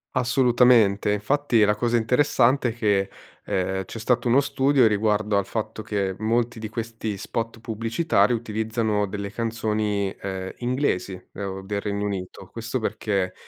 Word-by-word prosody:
Assolutamente, 120 -5 +4
infatti 115 +2 +2
la 105 0 +4
cosa 120 +1 0
interessante 125 +2 +3
è - - -8
che, 100 -4 +1 0.4
ehm, 95 0 -1
c'è 115 - -8
stato 120 +2 +1
uno 125 +4 +5
studio 135 -1 +3
riguardo 105 -1 +2
al 100 - +1
fatto 110 +1 -4
che 100 -3 -1
molti 115 +2 0
di 110 - -4
questi 115 -1 -4
spot 115 +3 -4
pubblicitari 115 +1 +1
utilizzano 110 -2 -1
delle 100 0 -5
canzoni, 110 -3 -1
ehm, 95 -1 -5
inglesi 125 -6 -1 0.2
o 95 -1 -5
del 100 +1 -3
Regno 100 0 -3
Unito. 95 -1 -6
Questo 115 +3 -3
perché 100 -4 -1
110 Hz, 140 wpm, -24 LUFS, 100-120 Hz, 0.4 s, uno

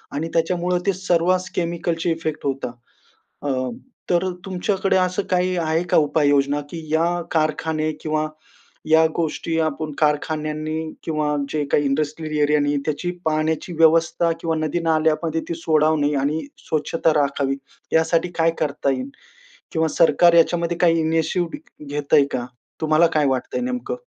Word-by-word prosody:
आणि 160 +3 -2
त्याच्यामुळं 175 +2 +1
ते 195 - +2
सर्वास 185 0 +1
केमिकलचे 170 -1 -1
इफेक्ट 160 -2 -3
होता. 135 -3 -2 0.7
अ, 145 - -3 0.6
तर 175 +1 +2 0.2
तुमच्याकडे 190 +1 0
असं 185 +2 +1
काही 180 0 +1
आहे 160 0 0
का, - - +4
उपाययोजना, 145 -1 +2
की 165 -1 -7
या 170 +2 +1
कारखाने 155 0 0
किंवा 155 0 -1 0.6
या 160 0 +6
गोष्टी, 165 0 -2
आपण 155 0 -1
कारखान्यांनी 155 +1 -1 0.2
किंवा 150 -2 -1
जे 150 -1 -1
काही 145 - +3
इंडस्ट्रियल 155 +2 -1
एरियानी, 145 0 +2
त्याची 160 +4 -2
पाण्याची 160 +2 0
व्यवस्था 165 +1 +4
किंवा 165 -1 0
नदी-नाल्यामध्ये 160 0 +1
ती - - -1
सोडावणे 155 -2 +2
आणि 150 +3 0 0.3
स्वच्छता 160 +1 +1
राखावी, 140 -1 -1 0.4
यासाठी 165 +2 +2
काय 165 0 +4
करता 140 -2 0
येईल? 130 +1 -3 0.6
किंवा 160 0 +1
सरकार 170 +1 +5
याच्यामध्ये 170 0 +3
काही 165 -2 +3
इनिशिव्ह 165 - 0 0.3
घेतंय 145 0 +3
का? 120 -1 -2 0.4
तुम्हाला 155 +2 +4
काय 150 - +3
वाटतंय, 130 - -1
नेमकं? 250 - -3
160 Hz, 130 wpm, -22 LUFS, 150-170 Hz, 0.7 s, या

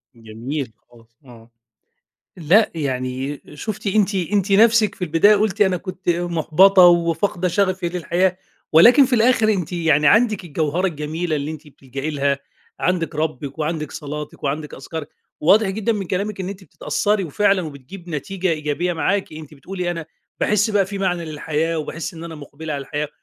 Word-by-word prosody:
جميل 115 +4 -6 0.2
خالص 115 -1 -22
آه 120 -2 -16 0.9
لأ، 180 +6 +3
يعني 130 -1 -3
شُفتِ 210 +7 -6
أنتِ 200 0 +2
أنتِ 195 +2 0
نفسِك 220 0 +5
في - - -12
البداية 170 +6 +5
قُلتِ 210 0 -1
أنا 190 -3 +4
كنت 185 +1 -8
محبطة 175 +2 +4
وفاقدة 175 +2 +2
شغفي 185 -1 0
للحياة، 180 +2 0 0.3
ولكن 240 - +8
في 255 - -9
الآخر 230 -1 +3
أنتِ 180 -4 -3
يعني 155 -4 +2
عندِك 215 +2 +3
الجوهرة 160 +3 -1
الجميلة 155 0 -3
اللي 145 +1 -3
أنتِ 155 -1 -9
بتلجئي 135 +1 -6
لها، 140 -2 0 0.4
عندِك 170 -2 0
رِّبك 150 -2 -3
وعندِك 155 0 -3
صلاتِك 150 0 -7
وعندِك 150 +2 -3
أذكارِك، 145 +3 -7 0.3
وواضح 200 +6 +4
جدًا 215 +4 -1
من 200 -3 -3
كلامِك 195 +3 -3
إن 185 - -3
أنتِ 195 -1 -8
بتتأثّري 205 +5 -1
وفعلًا 195 +4 +1
وبتجيب 155 +4 -10
نتيجة 185 +4 -2
إيجابية 155 +3 -1
معاكِ 190 +4 -1
أنتِ 155 -1 -10
بتقولي 180 +5 -4
أنا 165 -2 -5 0.3
باحس 210 +1 +2
بقى 200 -2 +2
فيه 200 0 -6
معنى 180 -3 -1
للحياة 155 +1 -2
وباحس 160 +3 -5
إن 165 0 -8
أنا 165 -1 -7
مُقبلة 150 +1 -8
على 140 - -3
الحياة، 145 +2 -4
170 Hz, 160 wpm, -21 LUFS, 150-195 Hz, 0.9 s, ولكن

